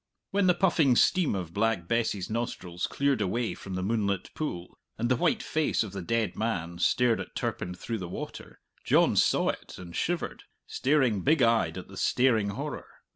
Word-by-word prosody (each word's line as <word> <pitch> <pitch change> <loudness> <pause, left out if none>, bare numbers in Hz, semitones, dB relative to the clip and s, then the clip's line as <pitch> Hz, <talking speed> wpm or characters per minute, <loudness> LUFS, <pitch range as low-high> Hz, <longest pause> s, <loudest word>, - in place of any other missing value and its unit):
When 200 -1 +2
the 180 - +5
puffing 165 -8 +3
steam 180 - +3
of 90 -3 -5
Black 105 -4 0
Bess's 110 -4 0
nostrils 95 -6 -3
cleared 140 -4 0
away 115 +4 -1
from 95 -1 -7
the 95 - -2
moonlit 100 -3 -1
pool, 90 - -5 0.2
and 120 +2 -1
the 125 - +4
white - - +1
face 155 -6 +1
of 105 - -7
the 100 0 -5
dead 115 +4 -1
man 85 -6 -2
stared 120 +5 +3
at - - -7
Turpin 90 0 -3
through 115 +4 -4
the 90 -2 -6
water, - - -8 0.2
John - - +4
saw - - +3
it - - -6
and 85 -2 -10
shivered, 175 0 -2 0.2
staring 130 -6 +1
big 145 - +3
eyed 115 -1 +2
at - - -7
the - - -12
staring 115 -5 +2
horror. 100 - -5
115 Hz, 180 wpm, -28 LUFS, 95-130 Hz, 0.2 s, the